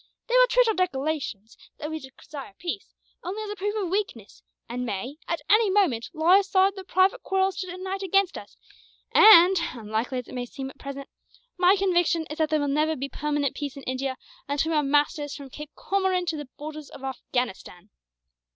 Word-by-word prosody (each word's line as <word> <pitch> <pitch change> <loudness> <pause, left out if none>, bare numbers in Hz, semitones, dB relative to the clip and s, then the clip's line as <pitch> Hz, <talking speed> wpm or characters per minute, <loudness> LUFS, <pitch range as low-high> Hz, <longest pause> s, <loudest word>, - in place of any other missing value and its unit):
They 485 - -3
will - - +7
treat - - +4
our 445 - +3
declarations, 290 - -2 0.2
that 300 0 -5
we 315 - -3
desire 265 -4 -11
peace, 355 +2 -6 0.3
only 400 +5 -4
as 415 - -5
a - - -4
proof 415 +2 -2
of 390 -5 -2
weakness; 375 - -3 0.3
and 245 +2 -4
may, 245 +5 -4
at 335 -3 -2
any 430 0 +5
moment, 360 - +2
lay 345 +3 +5
aside 390 0 +3
their 385 -1 -8
private 375 +5 +2
quarrels 385 0 0
to 375 -1 -4
unite 375 +2 -5
against 390 0 +2
us; - - -10 0.6
and, 380 -3 +8 0.2
unlikely 225 +2 -3
as 250 - -5
it - - -11
may 245 -1 -4
seem 265 +2 -7
at - - -23
present, 275 0 -7 0.5
my 365 +2 +5
conviction 350 -4 +2
is 310 - -6
that 315 -1 +2
there 310 0 +2
will 290 - 0
never 305 +3 +1
be 275 0 -4
permanent 295 -2 -1
peace 285 -2 -5
in 275 - -9
India 260 +1 -3 0.3
until 290 +3 0
we - - +1
are - - +4
masters 290 +1 +1
from 280 -3 -10
Cape 300 +2 -8
Comorin 380 -2 0
to 320 - -2
the 295 -3 -7
borders 305 0 -8
of 270 - -12
Afghanistan. 245 -7 -4
315 Hz, 195 wpm, -26 LUFS, 275-380 Hz, 0.6 s, and